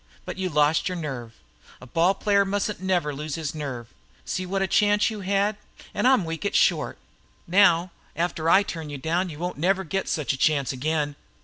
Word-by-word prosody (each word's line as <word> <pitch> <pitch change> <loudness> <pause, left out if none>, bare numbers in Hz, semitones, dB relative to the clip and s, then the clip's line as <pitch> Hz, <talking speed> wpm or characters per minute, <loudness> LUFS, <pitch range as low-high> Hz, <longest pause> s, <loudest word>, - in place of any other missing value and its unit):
But - - -6
you 185 -1 -1
lost 150 +2 +2
your 180 - -3
nerve. 130 -9 -5 0.5
A - - -12
ball 165 +9 +2
player 200 0 +3
mustn't 200 0 -2
never 180 -6 0
lose 150 +1 -4
his 160 -4 -4
nerve. 135 -6 -5 0.4
See 185 0 -3
what 195 +1 0
a - - 0
chance 205 +2 +3
you 215 - -6
had? 200 +2 0 0.4
I'm 255 -7 +3
weak 165 +2 -5
at 200 - -1
short. - - +2 0.5
Now, 180 -1 +4 0.2
after 165 -1 -1
I 195 - +6
turn 165 -5 -6
you 145 - -5
down 170 +6 -1
you 150 - -8
won't 175 -2 -4
never 190 +4 +2
get 195 +4 -3
such 150 -4 0
a - - -4
chance 140 -1 +2
again." 145 +2 -1
170 Hz, 195 wpm, -25 LUFS, 150-195 Hz, 0.5 s, I